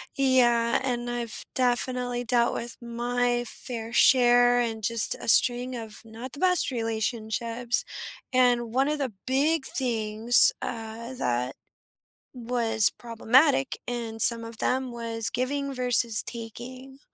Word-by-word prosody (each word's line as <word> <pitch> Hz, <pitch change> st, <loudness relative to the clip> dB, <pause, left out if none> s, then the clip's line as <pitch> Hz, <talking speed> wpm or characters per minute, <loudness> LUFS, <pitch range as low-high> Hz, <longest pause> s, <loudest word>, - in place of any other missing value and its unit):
Yeah, 240 Hz, -3 st, +2 dB
and 240 Hz, -2 st, -2 dB
I've 240 Hz, -2 st, -5 dB
definitely 245 Hz, -1 st, -1 dB
dealt 235 Hz, 0 st, +1 dB
with 235 Hz, 0 st, -6 dB
my 240 Hz, +1 st, -1 dB
fair 230 Hz, -3 st, -7 dB
share 245 Hz, 0 st, +5 dB
and 225 Hz, -2 st, -3 dB
just 230 Hz, +2 st, +1 dB
a -, -, -10 dB
string 245 Hz, +2 st, +2 dB
of 220 Hz, -2 st, -8 dB
not 230 Hz, +3 st, -9 dB
the 285 Hz, -, -9 dB
best 360 Hz, -4 st, +2 dB
relationships, 230 Hz, +1 st, -2 dB, 0.5 s
and 245 Hz, -3 st, +2 dB
one 265 Hz, +2 st, +2 dB
of 300 Hz, 0 st, -1 dB
the 265 Hz, -4 st, -2 dB, 0.2 s
big 280 Hz, +3 st, +1 dB
things, 225 Hz, -2 st, +3 dB
uh, 230 Hz, +1 st, -6 dB
that 125 Hz, -, -2 dB, 0.8 s
was 235 Hz, -3 st, +2 dB
problematic 255 Hz, +4 st, +1 dB
in 230 Hz, -2 st, -5 dB
some 230 Hz, +1 st, +4 dB
of 230 Hz, 0 st, -10 dB
them 260 Hz, 0 st, -1 dB
was 230 Hz, -2 st, -2 dB
giving 275 Hz, +2 st, -2 dB
versus 245 Hz, -3 st, +2 dB
taking, 250 Hz, +3 st, -9 dB
240 Hz, 125 wpm, -26 LUFS, 230-255 Hz, 0.8 s, share